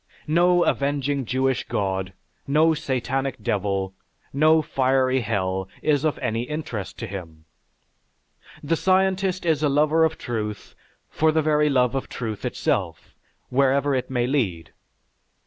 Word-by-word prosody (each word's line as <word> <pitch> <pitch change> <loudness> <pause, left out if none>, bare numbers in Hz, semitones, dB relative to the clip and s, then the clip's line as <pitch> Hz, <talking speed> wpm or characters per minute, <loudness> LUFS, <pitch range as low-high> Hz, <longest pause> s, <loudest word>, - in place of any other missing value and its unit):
No 175 +3 +3
avenging 140 -1 0
Jewish 130 +2 0
God, 95 -1 -2 0.3
no 155 +3 +4
satanic 135 -3 -2
devil, 100 -2 -1 0.4
no 155 +3 +4
fiery 130 -1 +1
hell 95 -3 -2
is 145 -2 +2
of 155 -2 0
any 115 +1 -2
interest 125 -7 -5
to 115 - -5
him. 85 -6 -9 1.2
The 160 +3 +1
scientist 190 0 +1
is 160 -3 +2
a 150 - +2
lover 150 +3 +3
of 160 0 +1
truth 105 -3 -5 0.3
for 160 0 +2
the 160 0 +1
very 150 0 +3
love 125 -3 +2
of 135 - -3
truth 110 -4 -5
itself, - - -2 0.4
wherever 140 +2 +2
it 130 -2 -1
may 125 -2 0
lead. 110 - -1
135 Hz, 130 wpm, -24 LUFS, 110-155 Hz, 1.2 s, no